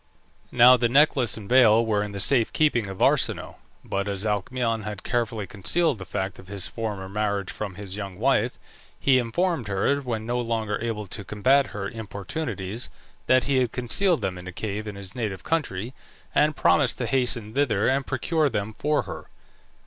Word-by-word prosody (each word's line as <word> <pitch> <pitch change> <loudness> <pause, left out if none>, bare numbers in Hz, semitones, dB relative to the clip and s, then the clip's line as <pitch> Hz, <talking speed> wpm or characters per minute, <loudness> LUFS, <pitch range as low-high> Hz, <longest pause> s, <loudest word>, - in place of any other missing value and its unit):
Now 125 +1 +7
the 120 -1 +1
necklace 135 -3 +3
and 105 -3 -9
veil 115 -2 +5
were 105 -2 +1
in 105 0 -4
the 100 - -6
safe 120 +2 +3
keeping 135 -9 +2
of 95 -1 -3
Arsinoe; - - +1 0.3
but 100 +1 -2
as 100 0 -2
Alcmaeon 115 +2 -1
had 105 -1 -6
carefully 115 -3 -1
concealed 110 - +1
the 95 - -7
fact 95 0 -4
of 95 - -13
his 100 -1 -3
former 100 0 -5
marriage 100 -1 -2
from 100 -3 -6
his 100 -1 -7
young 100 -3 -6
wife, - - +1 0.4
he 130 -2 +4
informed 130 - -1
her, 100 +8 +1
when 115 -5 -4
no 120 +1 -1
longer 110 -3 -2
able 115 -2 -3
to 100 +2 -5
combat 130 +8 +2
her 100 -1 -5
importunities, 105 - -5 0.4
that 130 -1 +4
he 135 +1 +1
had 125 -3 +1
concealed 165 +9 +2
them 90 -1 -2
in 90 - -10
a - - -5
cave 105 +3 -4
in 105 - -6
his 100 -1 -9
native 105 -7 -4
country, 125 - -2 0.4
and 150 0 +3
promised 140 -5 +3
to 125 - -2
hasten 120 -4 0
thither 115 -7 +1
and 135 +1 +1
procure 150 +3 +1
them 105 -2 -3
for 150 +6 0
her. - - -8
110 Hz, 185 wpm, -25 LUFS, 100-130 Hz, 0.4 s, Now